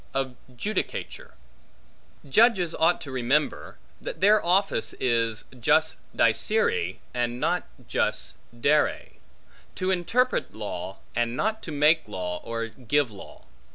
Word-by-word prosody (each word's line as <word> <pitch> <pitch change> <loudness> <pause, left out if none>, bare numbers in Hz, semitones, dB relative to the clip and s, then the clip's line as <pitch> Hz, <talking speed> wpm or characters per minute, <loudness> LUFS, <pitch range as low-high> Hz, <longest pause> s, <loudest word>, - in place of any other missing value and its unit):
Of 135 -2 -1 0.2
Judicature 210 - -4 0.9
JUDGES 190 - +4
ought 165 +2 +3
to 140 - -7
remember, 130 +4 0 0.2
that - - -6
their 210 +1 +5
office 185 - +2
is 115 -3 +1 0.2
jus 155 +7 +3 0.2
dicere, 465 0 +2 0.2
and 120 0 -1
not 170 +5 0 0.2
jus - - 0 0.3
dare; 150 +4 +2 0.7
to 185 +1 0
interpret 235 +8 +1
law, 95 -3 -5 0.2
and 120 +1 0
not 220 +1 0
to 165 - -7
make 150 +1 +3
law, 90 -3 -4
or 115 0 -3
give 130 +2 0
law. 100 - -13
145 Hz, 120 wpm, -26 LUFS, 115-185 Hz, 0.9 s, their